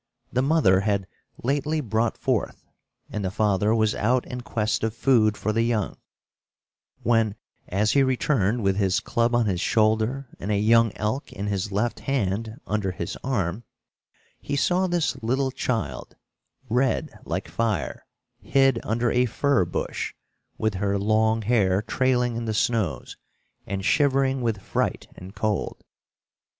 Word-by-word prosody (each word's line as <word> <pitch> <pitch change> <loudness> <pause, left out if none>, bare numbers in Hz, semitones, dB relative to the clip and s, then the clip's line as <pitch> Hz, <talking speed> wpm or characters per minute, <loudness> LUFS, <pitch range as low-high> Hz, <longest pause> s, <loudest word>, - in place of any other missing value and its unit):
The 125 - +2
mother 135 - +4
had 100 -1 0 0.4
lately 145 +4 0
brought 115 -3 0
forth, - - -2 0.5
and 105 - -3
the 95 - 0
father 105 +2 +2
was 110 -1 +2
out 125 +4 +1
in 125 0 -6
quest 110 -3 -1
of 110 0 -1
food 115 -4 +3
for 110 - -1
the 115 - +2
young, 115 -4 0 1.1
when, 115 -3 +2 0.3
as 105 +3 +1
he 140 - +4
returned 125 -4 +1
with 95 0 +2
his 100 +1 +2
club 115 +2 0
on 120 -1 +3
his 95 -4 -1
shoulder 110 +6 +1
and 100 - -5
a 105 - +2
young 115 +1 +4
elk 110 +6 -2
in 100 - -5
his 100 0 -2
left 105 +4 -1
hand, 110 -3 -2
under 105 -2 -1
his 85 -2 -5
arm, 110 -5 -1 0.8
he - - -3
saw 180 +6 +2
this 175 -2 -1
little 130 +4 0
child, 125 -3 -3 0.5
red 125 +1 0
like - - -3
fire, 105 +6 -2 0.3
hid 135 -3 +3
under 115 +2 0
a 125 +1 +3
fir 135 -4 +2
bush, 85 - -4 0.4
with 110 -1 0
her 100 +1 0
long 110 +2 +2
hair 100 -4 +2
trailing 125 -1 +1
in 115 0 -3
the 110 -1 -2
snows, 110 -3 -1 0.5
and 95 -1 -3
shivering 135 0 +2
with 110 -5 -1
fright - - -1
and 95 +3 -11
cold. 105 -2 -2
110 Hz, 150 wpm, -25 LUFS, 105-125 Hz, 1.1 s, mother